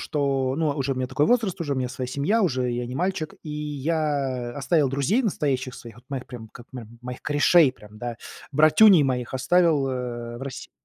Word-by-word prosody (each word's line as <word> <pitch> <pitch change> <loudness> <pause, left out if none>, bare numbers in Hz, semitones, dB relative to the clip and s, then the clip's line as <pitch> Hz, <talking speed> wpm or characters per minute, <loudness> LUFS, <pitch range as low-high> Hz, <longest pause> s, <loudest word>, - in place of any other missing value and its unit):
что, 135 -4 -1
ну, 160 0 +1
уже 140 -2 -1
у - - -4
меня 130 0 -3
такой 135 +3 +1
возраст, 225 -7 +1
уже 150 -4 -2
у - - -2
меня 130 -1 -1
своя 125 0 -5
семья, 145 - 0
уже 130 -8 0
я 120 0 -3
не 125 - -6
мальчик, 180 -1 -2
и 155 - -7
я 145 -4 -2
оставил 145 +1 +2
друзей 140 - +1
настоящих 135 - -1
своих, 115 -2 -11
вот 120 - -17
моих 135 -2 -5
прям, 115 -3 -9
к 120 - -13
мо 125 -4 -8
моих 125 0 -8
корешей, 145 0 +4
прям, 105 -3 -16
да, 120 0 -5 0.4
братюней 155 +5 +6
моих 125 -3 -2
оставил, 155 0 +2
э, 120 -2 -5
в - - -9
России. 135 -2 -7
135 Hz, 205 wpm, -24 LUFS, 125-155 Hz, 0.4 s, братюней